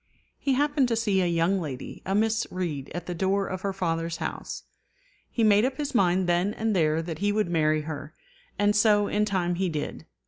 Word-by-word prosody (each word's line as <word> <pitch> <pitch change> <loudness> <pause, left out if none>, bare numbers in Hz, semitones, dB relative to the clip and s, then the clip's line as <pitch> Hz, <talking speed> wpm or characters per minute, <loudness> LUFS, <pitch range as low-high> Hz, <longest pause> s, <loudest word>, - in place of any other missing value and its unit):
He 275 - +1
happened 285 0 +2
to 235 - 0
see 205 -4 +1
a 180 - +2
young 170 +3 +1
lady, 135 -5 -6
a 195 - +1
Miss 220 +1 +1
Read, 160 -7 -4
at 175 -1 -4
the 180 - -4
door 195 +3 +1
of 185 -1 -5
her 200 - -1
father's 165 -3 -2
house. - - -5 0.7
He 230 - -1
made 210 -1 +5
up 260 +1 0
his 290 -1 -3
mind 185 -4 +3
then 175 +4 +1
and 220 -1 0
there 160 -2 +2
that 165 -2 -5
he 205 +1 +1
would 210 -3 0
marry 155 -2 +2
her; 150 0 -7 0.4
and 205 +1 +2
so 210 -1 +4
in 210 0 +1
time 185 -4 0
he 190 - +1
did. 150 -3 -5
190 Hz, 210 wpm, -26 LUFS, 165-210 Hz, 0.7 s, made